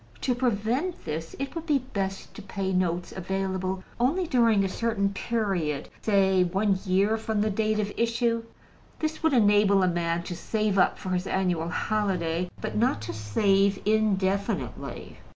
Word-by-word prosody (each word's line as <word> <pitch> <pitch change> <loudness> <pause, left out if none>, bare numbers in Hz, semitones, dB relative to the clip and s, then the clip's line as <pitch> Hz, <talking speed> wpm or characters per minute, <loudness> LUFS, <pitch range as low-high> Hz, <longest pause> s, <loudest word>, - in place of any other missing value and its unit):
To 255 - +1
prevent 245 - -1
this, 160 +1 -4
it 275 0 -4
would 330 0 -6
be 295 -3 +4
best 200 -7 -4
to 220 - -9
pay 195 -1 -3
notes 175 -1 0
available 190 0 -2 0.2
only 305 +10 +2
during 230 -8 +3
a - - +1
certain 200 0 0
period, 195 -11 -1
say 190 -3 +3
one 190 +2 +1
year 200 +4 +3
from 220 -1 -1
the 215 0 +1
date 215 +1 0
of 205 -1 -1
issue. 230 0 +1 0.6
This 315 0 -3
would 320 -2 +2
enable 205 -4 +5
a - - +3
man 170 -1 0
to 175 - -5
save 215 +1 0
up - - +3
for 185 - -6
his 185 0 -1
annual 180 -3 0
holiday, 180 -3 -1
but - - -4
not 235 - +2
to 115 +1 -5
save 195 - +2
indefinitely. 200 -2 -1
200 Hz, 160 wpm, -27 LUFS, 185-225 Hz, 0.6 s, enable